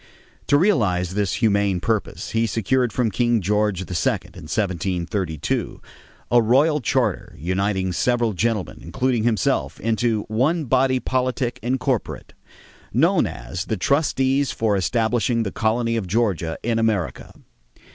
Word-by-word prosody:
To 145 - +5
realize 100 - +1
this 100 -3 0
humane 100 -4 +2
purpose, 110 +2 -2
he 115 0 +1
secured 120 +3 0
from 120 -4 0
King 120 +2 +2
George 105 0 0
II, - - -5
in 90 - -3
1732, 90 -3 -2 0.5
a 120 0 +6
royal 140 +7 +3
charter 120 -6 -1
uniting 95 +3 -1
several 120 +2 +1
gentlemen, 105 0 -1
including 125 -4 -1
himself, 115 -3 0
into 115 -1 0
"one 145 +9 0
body 130 +1 +2
politic 130 -1 -1
and 125 +4 -1
corporate," 130 -5 -3 0.6
known - - +3
as 85 - -6
the 110 - -2
"Trustees 135 - +1
for 110 -2 0
establishing 115 +4 +1
the 100 - -3
colony 115 +1 0
of 100 -5 -3
Georgia 95 -6 0
in 115 -1 0
America." 110 -6 -1
110 Hz, 130 wpm, -22 LUFS, 95-125 Hz, 0.6 s, a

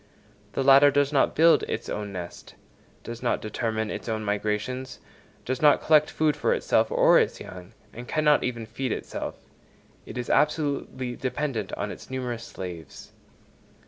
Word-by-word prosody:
The 135 - -1
latter 140 +1 +7
does 145 +1 +1
not 135 - +2
build 165 +2 +5
its - - -4
own 105 -1 -4
nest, 90 -3 -8 0.5
does 115 0 -7
not 125 - 0
determine 110 0 -3
its - - -6
own 110 -1 -2
migrations, 105 +5 -2 0.5
does 130 0 -3
not 150 -1 +6
collect 155 -1 +4
food 155 -2 +1
for 150 - +1
itself - - +1
or - - +5
its - - 0
young, 90 0 -10 0.2
and 120 +2 -9
cannot 150 -1 +3
even 120 -2 -3
feed 115 +3 -4
itself: - - -4 0.7
it - - -8
is 125 - -4
absolutely 145 -4 0
dependent 130 -5 -3
on 100 0 -3
its - - -11
numerous 125 -3 -4
slaves. 85 -6 -9
125 Hz, 155 wpm, -26 LUFS, 110-140 Hz, 0.7 s, latter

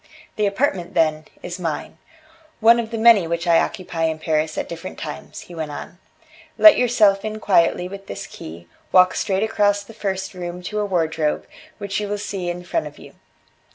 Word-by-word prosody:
The 210 -1 +1
apartment, 195 -5 -1
then, 155 -2 +2 0.2
is 175 +1 -6
mine; 165 -4 -4 0.6
one 230 +1 +6
of 225 -1 -3
the 230 - -4
many 220 -6 +6
which 170 0 -2
I 170 -1 +5
occupy 175 -5 -2
in 160 -1 -1
Paris 155 -1 -1
at - - -2
different 170 +2 -8
times," 150 -2 -7
he 175 - -13
went 160 -2 -4
on. 160 +4 -8 0.6
"Let 320 - +9
yourself 215 -5 +3
in 215 0 -4
quietly 180 -3 +2
with 195 +1 -10
this - - -6
key, 85 +2 -10 0.2
walk 185 0 +6
straight 195 0 0
across 205 -2 +1
the 225 - -13
first 190 -3 -3
room 180 -1 -6
to 210 +4 -3
a 210 - 0
wardrobe, 160 -4 0 0.3
which 200 -1 -3
you 210 - -3
will 205 +1 -2
see 195 -3 -4
in 175 +1 -5
front 315 - -2
of - - -12
you. - - -14
185 Hz, 190 wpm, -21 LUFS, 165-210 Hz, 0.6 s, Let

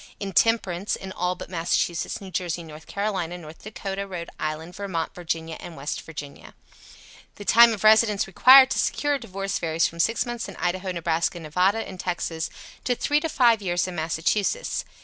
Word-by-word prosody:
Intemperance, 200 -1 +1
in 190 0 -8
all 180 0 -1
but - - -8
Massachusetts, 170 -1 -1
New 195 -2 -10
Jersey, 175 -2 -2
North 155 -1 -12
Carolina, 190 -4 -2
North 160 -2 -12
Dakotah, 200 -2 -5
Rhode 175 -3 -6
Island, 155 +3 -4
Vermont, 190 -5 -3
Virginia 165 -2 -4
and 170 - -9
West 140 +2 -4
Virginia. 145 -3 -10 0.8
The 205 - -10
time 235 +2 +7
of 215 -3 -4
residence 215 -1 +5
required 260 +7 +7
to - - 0
secure 290 0 +1
a 280 - 0
divorce 195 -4 -4
varies 165 -1 +1
from 170 - -4
6 225 +8 +2
months 240 -3 -5
in 195 - -9
Idaho, 185 +1 -2
Nebraska, 170 0 -1
Nevada 180 +7 +1
and 185 -1 -9
Texas 165 -3 -3 0.3
to 250 - +1
3 295 +4 +1
to 325 - -3
5 235 -6 +4
years 175 -2 0
in 185 - -5
Massachusetts. 175 - -1
185 Hz, 175 wpm, -25 LUFS, 165-215 Hz, 0.8 s, time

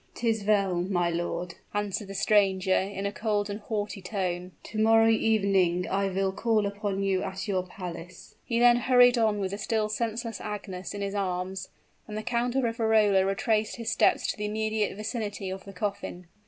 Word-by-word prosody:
"'Tis 225 -3 0
well, 200 -4 +2
my 175 -2 0
lord," 175 +1 -3 0.2
answered 205 0 -2
the 195 - -8
stranger, 195 -2 +3
in 195 +1 -1
a 200 - 0
cold 205 -1 -1
and 205 - -4
haughty 210 -2 -4
tone. 180 -2 -3
"To 215 - -5
morrow 225 +1 +5
evening 195 -5 +2
I 195 +1 0
will 190 0 0
call 215 +1 +1
upon 200 -1 -2
you 195 -1 +1
at 190 +2 -4
your 190 -2 +1
palace." 180 -1 -9
He 230 - -1
then 240 0 +6
hurried 245 0 +5
on 215 -2 +2
with 195 -2 -2
the 200 - -5
still 215 0 0
senseless 230 +1 -3
Agnes 200 -3 -6
in 200 - -5
his 200 0 -3
arms; 190 -1 -3 0.4
and 210 -1 -6
the 215 - -4
Count 245 +1 -1
of 270 - +2
Riverola 220 -4 +3
retraced 215 +2 0
his 230 0 -3
steps - - +3
to - - -10
the 210 - -3
immediate 215 0 -1
vicinity 210 -3 -4
of 190 0 -7
the 200 - -9
coffin. 195 -2 -4
205 Hz, 185 wpm, -28 LUFS, 190-220 Hz, 0.4 s, then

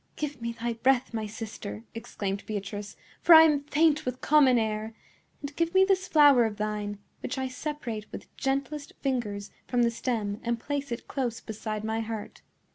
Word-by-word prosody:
"Give 290 -4 -4
me 235 0 -2
thy 235 +1 -3
breath, 245 +2 +2
my 220 -1 -2
sister," 215 0 -7
exclaimed 205 -4 -4
Beatrice; 205 0 -5 0.3
"for 340 - +8
I 320 - +11
am 295 -3 +3
faint 310 +1 +3
with 250 0 -3
common 280 -4 +5
air. 220 0 -2 0.5
And 285 0 -6
give 335 +2 0
me 380 0 +7
this 380 -1 +1
flower 290 -6 +6
of 215 -2 -3
thine, 210 -1 -3 0.2
which - - -4
I 265 0 -1
separate 255 -6 -5
with - - -10
gentlest 280 +2 -2
fingers 215 -7 -2 0.2
from 245 -1 +2
the 235 - +3
stem 220 -3 -2
and 235 0 -1
place 285 0 -3
it 235 - -5
close 245 -5 -2
beside 215 0 -5
my 220 +1 -1
heart." 220 -1 -6
235 Hz, 180 wpm, -28 LUFS, 215-285 Hz, 0.5 s, I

